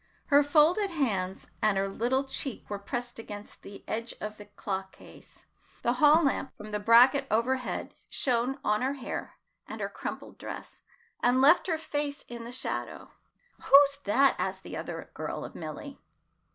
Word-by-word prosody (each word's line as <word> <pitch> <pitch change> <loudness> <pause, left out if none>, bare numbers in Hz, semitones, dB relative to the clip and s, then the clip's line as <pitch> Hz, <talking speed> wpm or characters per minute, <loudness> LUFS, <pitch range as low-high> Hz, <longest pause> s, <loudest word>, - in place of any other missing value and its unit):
Her 285 0 +7
folded 315 +8 +4
hands 200 - -1 0.2
and 215 -2 +3
her 195 0 +1
little 245 +7 0
cheek 270 -1 -4
were 205 - -3
pressed 240 +4 -5
against 205 -2 -9
the 200 - -11
edge 230 +2 -3
of 215 0 -6
the 205 - -11
clock 195 -2 -5
case. - - -16 0.4
The 240 - +2
hall 305 +3 +7
lamp 275 -1 0
from 215 0 -9
the 210 - -1
bracket 245 +6 +6
overhead 250 +4 -1 0.2
shone 250 +1 0
on 210 +1 +1
her 265 +2 0
hair 265 - -6 0.3
and - - -7
her - - -2
crumpled - - -7
dress, - - -8 0.4
and 245 +2 +3
left 290 +8 +6
her 325 -3 +1
face 290 -2 -3
in 235 -1 -7
the 235 - -7
shadow. 250 - -4 0.5
"Who's 280 0 +6
that?" 270 +6 +4
asked - - -2
the - - -7
other - - -6
girl - - -5
of - - -9
Milly. - - -8
245 Hz, 165 wpm, -29 LUFS, 215-280 Hz, 0.5 s, Her